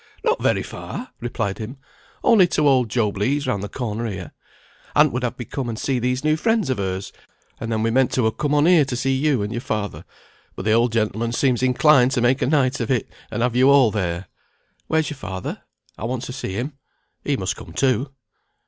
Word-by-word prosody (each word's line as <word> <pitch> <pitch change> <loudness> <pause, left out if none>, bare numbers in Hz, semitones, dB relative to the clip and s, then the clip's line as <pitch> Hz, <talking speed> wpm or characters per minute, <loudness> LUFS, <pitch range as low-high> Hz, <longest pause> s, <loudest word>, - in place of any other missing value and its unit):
"Not 465 +1 +1
very - - +2
far," 255 - -7
replied 110 -4 -3
he. 115 +4 -6 0.5
"Only 205 -6 +6
to 150 -3 +1
old 130 -4 +3
Job 105 -3 0
Legh's 140 +7 +1
round 100 - -1
the 105 - -5
corner 115 0 -3
here. 95 -5 -6 0.6
Aunt 150 -1 +5
would 125 - -1
have 125 0 -2
me 120 - -5
come 130 0 -4
and 110 - -4
see 130 +1 -1
these 125 +2 -1
new 155 0 +3
friends 215 - +1
of 130 - -2
hers, 95 0 -3 0.5
and 115 - -4
then 110 -1 0
we 115 - +1
meant 130 +1 +3
to 125 -4 +2
ha' - - +2
come 150 0 0
on 145 +1 +4
here 170 -3 +6
to 135 -2 -3
see 135 +2 0
you 135 -5 +1
and 105 - -4
your 120 - -3
father, 105 -4 -3 0.5
but - - -6
the 110 - +2
old 115 +2 +3
gentleman 115 +1 0
seems 125 -2 +1
inclined 130 +1 +5
to 130 - +1
make 125 +3 +2
a - - +2
night 135 -3 +2
of 115 - -2
it, 125 -5 0 0.2
and 120 - -2
have 120 -1 0
you 130 +2 +5
all 135 -5 +6
there. 95 -3 -2 0.6
Where's 160 -1 +1
your 145 - -7
father? 95 -7 -5 0.4
I 110 - -4
want 125 +1 -3
to 125 - -6
see 125 -7 -5
him. 125 +9 -3 0.5
He - - 0
must - - -2
come - - -11
too." 135 - +1
125 Hz, 225 wpm, -22 LUFS, 110-140 Hz, 0.6 s, Only